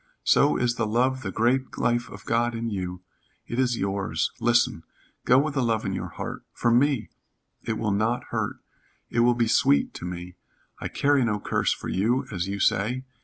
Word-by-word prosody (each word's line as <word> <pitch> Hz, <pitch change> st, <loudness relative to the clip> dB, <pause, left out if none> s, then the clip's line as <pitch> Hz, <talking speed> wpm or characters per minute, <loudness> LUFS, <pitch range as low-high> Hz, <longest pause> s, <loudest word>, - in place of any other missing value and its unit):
So 145 Hz, -, +4 dB
is 120 Hz, -1 st, 0 dB
the 115 Hz, -, 0 dB
love 130 Hz, +4 st, +1 dB
the -, -, -4 dB
great 125 Hz, +4 st, 0 dB
life 120 Hz, 0 st, 0 dB
of 105 Hz, -, -11 dB
God 120 Hz, +1 st, +1 dB
in 115 Hz, 0 st, -3 dB
you. 90 Hz, -2 st, -4 dB, 0.4 s
It 120 Hz, -, -4 dB
is 125 Hz, -2 st, +2 dB
yours. 100 Hz, 0 st, -1 dB
Listen. 120 Hz, -7 st, +2 dB, 0.4 s
Go 125 Hz, -, +6 dB
with 145 Hz, +2 st, +2 dB
the 135 Hz, -, 0 dB
love 115 Hz, -2 st, 0 dB
in 95 Hz, -, -1 dB
your 95 Hz, -, -3 dB
heart -, -, -6 dB
for 120 Hz, -, +1 dB
me, 130 Hz, -1 st, +2 dB, 0.6 s
it 115 Hz, -, 0 dB
will 105 Hz, -2 st, -1 dB
not 110 Hz, +4 st, 0 dB
hurt. -, -, -1 dB, 0.6 s
It 115 Hz, -, 0 dB
will 120 Hz, +1 st, +4 dB
be 120 Hz, -1 st, +1 dB
sweet 70 Hz, -9 st, +3 dB
to -, -, -7 dB
me. 90 Hz, 0 st, -7 dB, 0.4 s
I -, -, -3 dB
carry 140 Hz, -2 st, +2 dB
no 105 Hz, -3 st, 0 dB
curse -, -, 0 dB
for -, -, -4 dB
you, 120 Hz, +8 st, +1 dB
as 90 Hz, -2 st, -2 dB
you 100 Hz, 0 st, -3 dB
say. 120 Hz, +8 st, +1 dB
115 Hz, 195 wpm, -26 LUFS, 100-125 Hz, 0.6 s, Go